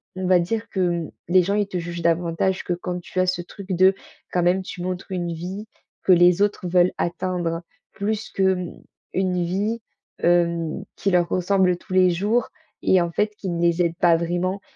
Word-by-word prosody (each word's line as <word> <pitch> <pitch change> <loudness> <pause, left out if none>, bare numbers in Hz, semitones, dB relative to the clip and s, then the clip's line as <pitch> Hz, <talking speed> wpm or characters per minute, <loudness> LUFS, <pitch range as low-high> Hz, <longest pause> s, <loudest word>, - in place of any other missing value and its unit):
on 185 0 -3
va 185 -1 +5
dire 220 +6 -2
que, 190 - -4
hem, 175 -3 0 0.2
les 180 +1 +5
gens 200 +3 0
ils 205 -1 +1
te 185 -2 -3
jugent 170 0 -5
davantage 170 +3 +1
que - - -5
quand 180 0 -4
tu 185 - -5
as 185 - +4
ce 180 -1 0
truc 190 +2 -11
de, 185 +2 +5 0.4
quand 180 - +1
même, 180 +2 +3
tu 180 - -8
montres 185 +2 -4
une 175 -2 -2
vie 185 +6 -6 0.4
que 190 - +6
les 175 +1 +5
autres 205 -2 +1
veulent 180 0 +4
atteindre 175 -1 -2 0.3
plus 215 +2 -3
que, 195 - -1
hem, 180 -2 -7 0.3
une 180 -2 0
vie, 205 +6 -1 0.4
hem, 170 -2 +1
qui 195 - -1
leur 175 -1 +3
ressemble 185 0 +2
tous 180 - -17
les 185 -1 +5
jours 210 +7 +1 0.4
et 185 - +4
en 170 -1 -1
fait, 210 +4 0
qui 190 - -5
ne 170 -1 -2
les 170 0 +2
aident 170 -1 -1
pas 170 -1 +5
vraiment 175 +3 -1
180 Hz, 205 wpm, -23 LUFS, 175-190 Hz, 0.4 s, que